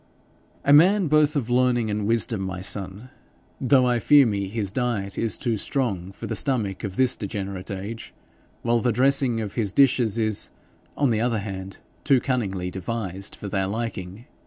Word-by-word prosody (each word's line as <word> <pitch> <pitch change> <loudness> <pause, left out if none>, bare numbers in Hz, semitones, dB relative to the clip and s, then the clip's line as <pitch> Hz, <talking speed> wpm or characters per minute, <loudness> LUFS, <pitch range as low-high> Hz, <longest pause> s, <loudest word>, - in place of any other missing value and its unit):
'A 140 - +5
man 185 +6 +6
both 150 -1 +3
of 135 -6 -1
learning 120 -3 +2
and 105 0 -2
wisdom, 115 -2 +2
my 95 -1 -4
son, 100 +5 -4 0.5
though 130 0 +4
I 120 -1 +2
fear 145 +5 +6
me 100 -4 -1
his 100 -1 -3
diet 110 -5 -2
is 115 -3 0
too 115 -3 -1
strong 100 -8 -2
for - - -9
the - - -3
stomach 110 -9 -1
of 100 -3 -4
this 130 +1 +2
degenerate 100 -3 -5
age, 100 +4 -6 0.5
while 120 0 +2
the 120 +1 +1
dressing 130 0 +2
of 105 -3 -5
his 105 -5 -1
dishes 120 -3 +3
is, 110 -2 -1 0.5
on 140 -4 +2
the 110 -1 +1
other 120 -1 +1
hand, 95 -2 -6 0.3
too 135 -3 +4
cunningly 100 -9 -2
devised 95 0 -5
for 105 - -8
their 95 -1 -1
liking. 110 -1 -5
110 Hz, 175 wpm, -24 LUFS, 100-125 Hz, 0.5 s, man